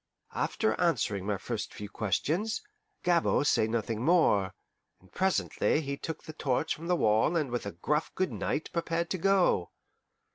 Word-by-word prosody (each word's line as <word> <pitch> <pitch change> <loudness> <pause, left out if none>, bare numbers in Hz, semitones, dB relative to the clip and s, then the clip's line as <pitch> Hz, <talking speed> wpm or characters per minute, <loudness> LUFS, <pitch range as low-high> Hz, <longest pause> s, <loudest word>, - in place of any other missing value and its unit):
After - - 0
answering 100 -2 +1
my 105 -2 0
first 115 +2 -5
few 105 - -6
questions, 155 - -1 0.4
Gabord 170 -4 +3
say 110 - +3
nothing 115 -1 -2
more, 125 - +3 0.4
and 95 - -23
presently 190 -4 +1
he 140 -2 -3
took 160 +3 -6
the 155 - -8
torch 145 +1 0
from 165 +2 -8
the 180 - +3
wall 110 +4 +3
and 145 -6 -1
with 120 -4 -2
a - - -3
gruff 150 - -1
good 185 0 0
night 155 - -2
prepared 170 0 -1
to 185 - -1
go. 190 - +3
145 Hz, 160 wpm, -30 LUFS, 105-170 Hz, 0.4 s, Gabord